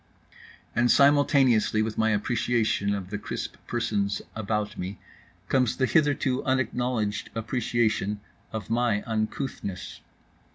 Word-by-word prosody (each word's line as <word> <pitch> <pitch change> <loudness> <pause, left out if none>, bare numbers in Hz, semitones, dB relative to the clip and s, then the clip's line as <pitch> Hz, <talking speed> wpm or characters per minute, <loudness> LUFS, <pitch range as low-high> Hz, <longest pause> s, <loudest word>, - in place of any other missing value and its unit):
And 120 0 +3
simultaneously 140 -6 +4
with 110 0 -3
my 110 0 +2
appreciation 110 -1 +1
of 95 -2 -6
the 105 - -3
crisp - - -5
persons 100 -4 0 0.2
about 105 -1 -2
me 95 +2 -5 0.5
comes 125 -4 +2
the 130 - +3
hitherto 140 -3 +2
unacknowledged 125 -4 0
appreciation 110 -3 0 0.3
of 110 -1 -5
my 115 -3 +1
uncouthness. 110 -3 -4
110 Hz, 110 wpm, -27 LUFS, 105-125 Hz, 0.5 s, simultaneously